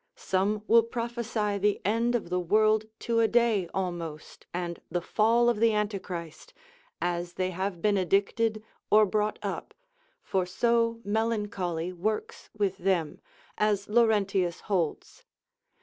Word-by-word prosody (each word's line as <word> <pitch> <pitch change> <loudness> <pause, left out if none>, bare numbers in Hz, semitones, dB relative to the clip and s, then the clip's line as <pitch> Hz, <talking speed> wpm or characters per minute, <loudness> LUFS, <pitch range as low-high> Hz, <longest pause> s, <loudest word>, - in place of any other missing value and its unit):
Some 200 +3 0
will 230 +1 +6
prophesy 230 -2 -2
of - - -8
the 205 0 +2
end 230 +4 +1
of 210 -7 -3
the 180 - +1
world 215 +4 +3 0.2
to 230 -1 +1
a 225 - +4
day 230 -6 +2
almost, 170 -5 -5
and 175 -1 -4
the 175 - -1
fall 225 +6 +2
of 240 -3 +2
the 225 -1 +4
Antichrist, 195 - -4 0.4
as 175 0 -2
they 185 0 -1
have 185 -1 -3
been 205 -1 +3
addicted 210 +4 +1 0.3
or 215 0 +6
brought 210 +1 0
up; - - -5 0.5
for 190 -1 0
so 230 +5 +1
melancholy 205 -6 -1
works 210 +5 -3
with 200 -3 0
them, 175 -5 0 0.4
as 205 -2 +1
Laurentius 205 -6 +2
holds. 180 -7 -2
205 Hz, 135 wpm, -28 LUFS, 180-225 Hz, 0.5 s, will